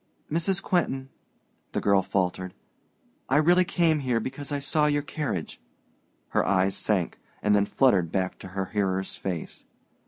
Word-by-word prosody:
"Mrs. 185 +4 +1
Quentin," 135 -7 0 0.6
the - - 0
girl 100 -1 +3
faltered, 95 -1 -2 0.7
"I 135 - +4
really 175 +4 +5
came 165 -3 +2
here 125 -4 0
because 135 +4 -5
I 145 - 0
saw 150 +2 +1
your 145 -1 +1
carriage." 145 - -4 0.7
Her - - +2
eyes 95 +1 +2
sank, 95 -6 0 0.2
and 105 0 +4
then 100 0 +3
fluttered 100 -11 +3
back 95 -1 -1
to - - -9
her 95 +1 -3
hearer's 95 -2 -1
face. 90 -4 -5
115 Hz, 150 wpm, -27 LUFS, 95-150 Hz, 0.7 s, really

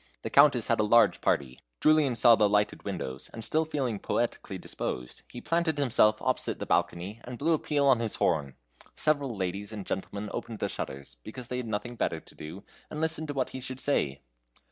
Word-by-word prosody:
The - - -4
Countess 140 -5 +6
had 115 - +2
a - - +4
large 105 -3 +4
party. 65 -3 0 0.2
Julian 155 -5 +4
saw 115 +1 +7
the 105 -2 +3
lighted 105 0 +1
windows, 65 +2 -5
and 115 - -7
still 160 +7 +1
feeling 130 -9 -2
poetically - - -2
disposed, 60 0 -5
he 120 - -8
planted 165 -2 0
himself 110 -6 +3
opposite - - 0
the - - -5
balcony, 95 +6 -1
and 125 0 -7
blew 165 +6 +2
a 155 - +2
peal 145 -2 +1
on 130 -4 +5
his 115 -2 -1
horn. 70 -4 0 0.4
Several 145 -5 +1
ladies 100 +2 -3
and 105 -3 -6
gentlemen 100 +2 -4
opened 115 -1 -5
the - - -2
shutters, 70 +1 -6
because 120 +3 -8
they 125 - -2
had 125 -2 -4
nothing 115 +3 -4
better 80 - -1
to - - -16
do, 80 +6 -9 0.3
and 150 - -6
listened 160 0 -1
to 145 - -4
what 130 -2 0
he 130 - -7
should 130 0 -6
say. 70 - 0
115 Hz, 205 wpm, -29 LUFS, 100-140 Hz, 0.4 s, saw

